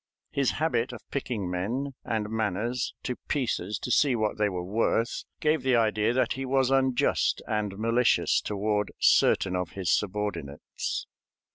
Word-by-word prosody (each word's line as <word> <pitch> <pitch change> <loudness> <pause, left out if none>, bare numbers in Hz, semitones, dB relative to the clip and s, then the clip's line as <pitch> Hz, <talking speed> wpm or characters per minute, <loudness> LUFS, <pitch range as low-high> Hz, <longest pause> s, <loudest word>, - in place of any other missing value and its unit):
His 140 -2 +1
habit 150 -6 0
of - - -8
picking 120 -8 -2
men 115 +11 -2
and 110 -2 -2
manners 110 +3 -1
to 125 - -3
pieces 110 - -1
to 125 - -2
see 135 0 +4
what 110 -2 -1
they 105 -1 +3
were 90 -2 -4
worth 115 +4 0
gave 155 -1 +2
the 130 -1 +2
idea 110 -1 +2
that 130 +1 +1
he 135 - -4
was 135 0 +2
unjust 130 -2 +2
and 105 -2 -2
malicious 115 +3 +2
toward 105 0 -1
certain 95 - +4
of 90 -2 -3
his 95 -4 -1
subordinates. 105 -8 -3
110 Hz, 150 wpm, -27 LUFS, 105-130 Hz, -, see